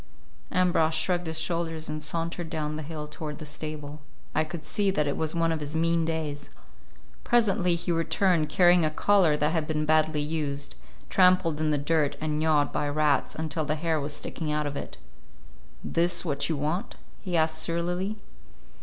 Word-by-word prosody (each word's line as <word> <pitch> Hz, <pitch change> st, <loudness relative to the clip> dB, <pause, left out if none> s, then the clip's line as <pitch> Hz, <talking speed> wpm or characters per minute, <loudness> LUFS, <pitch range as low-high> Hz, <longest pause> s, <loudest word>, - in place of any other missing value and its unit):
Ambrosch 165 Hz, -3 st, +2 dB
shrugged 175 Hz, +2 st, 0 dB
his 160 Hz, 0 st, -1 dB
shoulders 165 Hz, -1 st, -2 dB
and 155 Hz, 0 st, -4 dB
sauntered 165 Hz, +2 st, -3 dB
down 155 Hz, -2 st, -3 dB
the 155 Hz, -, -4 dB
hill 150 Hz, 0 st, -6 dB
toward 150 Hz, -1 st, -6 dB
the 155 Hz, -, -8 dB
stable. 150 Hz, 0 st, -6 dB, 0.3 s
I 155 Hz, -, +2 dB
could 155 Hz, 0 st, -7 dB
see 200 Hz, +5 st, 0 dB
that 155 Hz, -6 st, +1 dB
it 145 Hz, -, -1 dB
was 160 Hz, +1 st, -1 dB
one 165 Hz, -1 st, +2 dB
of 160 Hz, -, -1 dB
his 150 Hz, +1 st, -5 dB
mean 165 Hz, 0 st, +2 dB
days. 155 Hz, -3 st, -3 dB, 0.7 s
Presently 195 Hz, -7 st, +3 dB
he 170 Hz, +1 st, -2 dB
returned, 165 Hz, 0 st, +2 dB
carrying 175 Hz, +2 st, +5 dB
a 155 Hz, -, +3 dB
collar 170 Hz, -1 st, +3 dB
that 150 Hz, +1 st, +1 dB
had 160 Hz, -2 st, -1 dB
been 155 Hz, -1 st, -1 dB
badly 155 Hz, -1 st, +2 dB
used—trampled 150 Hz, -, 0 dB
in 155 Hz, -1 st, +1 dB
the 150 Hz, -, +2 dB
dirt 145 Hz, 0 st, +1 dB
and 155 Hz, -1 st, -1 dB
gnawed 155 Hz, -2 st, +2 dB
by 145 Hz, -, 0 dB
rats 150 Hz, -1 st, +1 dB
until 160 Hz, 0 st, -2 dB
the 150 Hz, +1 st, -1 dB
hair 160 Hz, -1 st, 0 dB
was 145 Hz, +2 st, -3 dB
sticking 155 Hz, +1 st, -3 dB
out 150 Hz, 0 st, 0 dB
of 145 Hz, 0 st, -3 dB
it. -, -, -6 dB, 0.9 s
"This 170 Hz, +1 st, +1 dB
what 140 Hz, -2 st, -1 dB
you 160 Hz, -, 0 dB
want?" 155 Hz, +7 st, -2 dB, 0.3 s
he 180 Hz, -2 st, -1 dB
asked 160 Hz, 0 st, +2 dB
surlily. 175 Hz, +5 st, -1 dB
155 Hz, 180 wpm, -27 LUFS, 150-170 Hz, 0.9 s, carrying